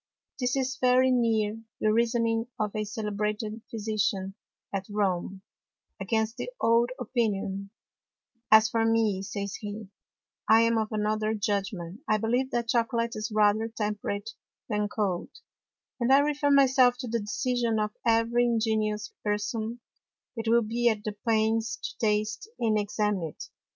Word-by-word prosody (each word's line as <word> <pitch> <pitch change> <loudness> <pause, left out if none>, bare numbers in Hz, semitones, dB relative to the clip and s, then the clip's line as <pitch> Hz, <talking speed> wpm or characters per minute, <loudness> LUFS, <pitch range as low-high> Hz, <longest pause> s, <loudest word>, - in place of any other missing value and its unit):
This 250 0 0
is 265 -1 -1
very 255 +1 +4
near 225 -3 +1 0.2
the 215 0 +2
Reasoning 230 0 +1
of 210 -1 -1
a 215 0 -1
celebrated 210 +1 -3
Physician 210 -3 -1 0.4
at 195 -1 -3
Rome 190 -2 -1 0.6
against 220 +3 -1
the - - -4
old 230 +1 +3
Opinion: 200 -4 -1 0.8
As 220 0 +7
for 225 +1 0
me, 225 -4 +2
says 200 0 -4
he, 210 -1 -7 0.6
_I 220 +1 +7
am 230 0 +3
of 220 0 -2
another 215 0 0
Judgment; 195 -3 -2
I 215 - +4
believe 245 +4 0
that 235 -3 -2
Chocolate 230 0 +1
is 215 +1 -4
rather 215 +1 +3
temperate 210 -1 -3 0.4
than 210 -2 -1
cold, 195 -5 -2 0.7
and 240 +1 +1
I 270 - +8
refer 290 0 +2
my 280 -1 +6
self 255 -2 +4
to 250 - -5
the 235 0 -1
Decision 230 +2 -1
of 210 0 0
every 230 +1 +3
ingenious 220 -2 0
Person 220 +3 -2 0.5
that 225 -1 -4
will 235 +1 +4
be 235 +2 +1
at 215 -2 -2
the 215 -2 -4
pains 220 0 +1
to - - -7
taste 215 - 0
and 220 -2 +2
examine 210 -1 0
it. - - -9
220 Hz, 145 wpm, -28 LUFS, 210-235 Hz, 0.8 s, I